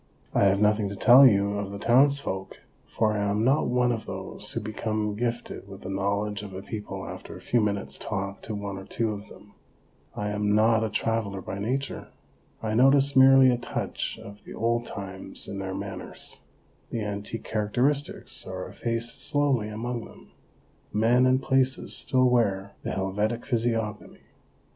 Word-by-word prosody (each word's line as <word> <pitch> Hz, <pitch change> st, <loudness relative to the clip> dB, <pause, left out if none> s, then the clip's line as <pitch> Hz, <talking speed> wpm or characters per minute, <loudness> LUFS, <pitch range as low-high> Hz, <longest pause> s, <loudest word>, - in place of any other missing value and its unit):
I -, -, +4 dB
have 100 Hz, 0 st, +4 dB
nothing 105 Hz, -1 st, +2 dB
to 100 Hz, -, -5 dB
tell 125 Hz, +7 st, +8 dB
you 100 Hz, -2 st, +2 dB
of 100 Hz, -1 st, -4 dB
the 100 Hz, -, -5 dB
townsfolk, 120 Hz, -4 st, +2 dB, 0.3 s
for 110 Hz, -1 st, +1 dB
I -, -, -1 dB
am 100 Hz, +1 st, +1 dB
not 135 Hz, +5 st, +3 dB
one 125 Hz, 0 st, +2 dB
of 115 Hz, -2 st, -4 dB
those -, -, -5 dB
who -, -, -2 dB
become 110 Hz, 0 st, -2 dB
gifted 120 Hz, -2 st, -3 dB
with 95 Hz, -1 st, -11 dB
the 95 Hz, -, -6 dB
knowledge 100 Hz, +1 st, -1 dB
of 100 Hz, -2 st, -8 dB
a 95 Hz, -, -6 dB
people 100 Hz, -3 st, -6 dB
after 90 Hz, +2 st, -8 dB
a -, -, -11 dB
few 120 Hz, +6 st, +1 dB
minutes' 100 Hz, -2 st, -2 dB
talk 100 Hz, -1 st, -4 dB
to 110 Hz, -, -5 dB
one 100 Hz, -1 st, -5 dB
or 95 Hz, -, -10 dB
two 110 Hz, +2 st, -1 dB
of 105 Hz, 0 st, -7 dB
them. 100 Hz, +1 st, -16 dB, 0.6 s
I 105 Hz, 0 st, -2 dB
am 105 Hz, 0 st, +1 dB
not 110 Hz, +1 st, +4 dB
a 110 Hz, -, 0 dB
traveller 110 Hz, -2 st, -1 dB
by 95 Hz, +1 st, -6 dB
nature. 130 Hz, +7 st, -3 dB, 0.6 s
I 110 Hz, -1 st, -1 dB
notice 135 Hz, +3 st, +4 dB
merely 130 Hz, -1 st, +8 dB
a 120 Hz, -, 0 dB
touch 120 Hz, -, -3 dB
of 100 Hz, +1 st, -12 dB
the -, -, -10 dB
old 120 Hz, +1 st, 0 dB
times 95 Hz, -1 st, -7 dB
in 100 Hz, -, -5 dB
their 95 Hz, -1 st, -4 dB
manners; -, -, -7 dB, 0.5 s
the 115 Hz, -, -3 dB
antique 105 Hz, +2 st, -5 dB
characteristics 125 Hz, +7 st, -1 dB
are 95 Hz, 0 st, -5 dB
effaced 115 Hz, 0 st, -3 dB
slowly 145 Hz, -7 st, +1 dB
among 115 Hz, +2 st, -4 dB
them. -, -, -16 dB, 0.6 s
Men 120 Hz, +4 st, +4 dB
and 130 Hz, 0 st, +4 dB
places 130 Hz, 0 st, +1 dB
still 130 Hz, -1 st, +3 dB
wear 100 Hz, -5 st, +1 dB
the -, -, -4 dB
Helvetic 105 Hz, +5 st, -1 dB
physiognomy. 115 Hz, -3 st, -2 dB
110 Hz, 170 wpm, -27 LUFS, 100-120 Hz, 0.6 s, tell